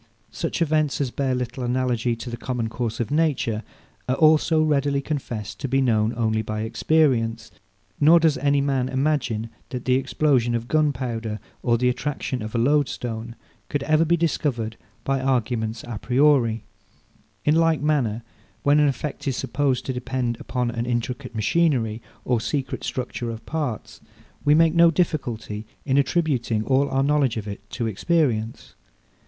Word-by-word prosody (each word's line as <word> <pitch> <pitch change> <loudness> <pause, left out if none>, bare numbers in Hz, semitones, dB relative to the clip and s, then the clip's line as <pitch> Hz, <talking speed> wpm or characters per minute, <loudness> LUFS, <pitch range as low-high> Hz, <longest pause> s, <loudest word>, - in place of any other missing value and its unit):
Such 170 - -1
events, 155 -2 +1
as 135 -4 -1
bear 135 -1 0
little 125 +1 -4
analogy 125 -1 0
to 115 +1 -7
the - - -3
common 120 -2 -3
course 115 -1 -3
of 120 +2 -2
nature, 145 -8 +1 0.5
are 130 - +3
also 155 +1 +4
readily 140 -2 +1
confessed 135 -7 -4
to 135 - -3
be 135 +1 +1
known 110 -4 +2
only 110 -2 +1
by 110 0 -4
experience; 115 -2 +1 0.5
nor 160 +3 +7
does 160 -2 +3
any 140 +1 +2
man 135 -2 0
imagine 130 -5 0 0.2
that 125 -2 -5
the 130 - +3
explosion 130 -2 +2
of 115 0 -3
gunpowder, 125 -8 -1 0.2
or 120 -2 +2
the 125 +2 +1
attraction 130 0 -2
of 110 +2 -6
a - - +2
loadstone, 120 -3 0 0.3
could 145 -2 -1
ever 155 +2 +3
be 170 +1 +2
discovered 130 -9 -1 0.3
by 135 -1 0
arguments 120 -3 -1
a 115 -3 -5
priori. 125 -3 +3 0.8
In 150 - +4
like 165 -1 +3
manner, 120 -7 +1 0.4
when 145 +1 +4
an 150 - +5
effect 140 +2 -3
is 135 - 0
supposed 135 0 0
to 130 - -2
depend 125 -1 -2
upon 125 0 -2
an 120 0 -3
intricate 125 +1 -3
machinery 115 -2 +1 0.2
or 120 -3 +1
secret 135 0 -3
structure 125 -1 -3
of 115 0 -7
parts, 145 -9 -4 0.4
we 145 +1 +5
make 165 0 +4
no 170 0 +6
difficulty 120 - -2 0.2
in 135 -2 +1
attributing 135 -8 0
all 135 +1 +2
our 135 0 +1
knowledge 140 -4 +2
of 110 -1 -5
it 100 0 -8
to 120 - -3
experience. 115 - 0
130 Hz, 160 wpm, -24 LUFS, 115-145 Hz, 0.8 s, nor